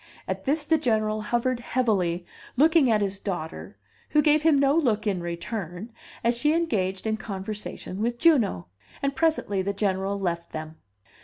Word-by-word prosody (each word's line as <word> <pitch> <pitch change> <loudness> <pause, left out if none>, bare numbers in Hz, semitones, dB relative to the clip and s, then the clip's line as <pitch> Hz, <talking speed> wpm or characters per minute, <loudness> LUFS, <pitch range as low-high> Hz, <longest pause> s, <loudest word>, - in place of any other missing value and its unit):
At - - -4
this 295 +2 +1
the 320 0 +3
General 215 -5 +1
hovered 240 +3 0
heavily, 195 -9 0 0.3
looking 310 -1 +5
at 215 -2 +3
his 195 0 -3
daughter, 175 -6 -5 0.3
who 300 -1 +3
gave 300 0 +4
him 310 -2 +4
no 275 +1 +3
look 230 -9 +1
in 195 -4 0
return, 175 +4 -5 0.3
as 235 +1 +2
she 295 +6 +2
engaged 195 - -1
in 220 0 0
conversation 205 -1 -6
with 235 +1 0
Juno; 245 - +3 0.4
and 275 0 0
presently 290 -11 +1
the 200 +2 -2
General 195 -1 -1
left 170 -3 -3
them. 155 0 -6
215 Hz, 160 wpm, -26 LUFS, 190-275 Hz, 0.4 s, looking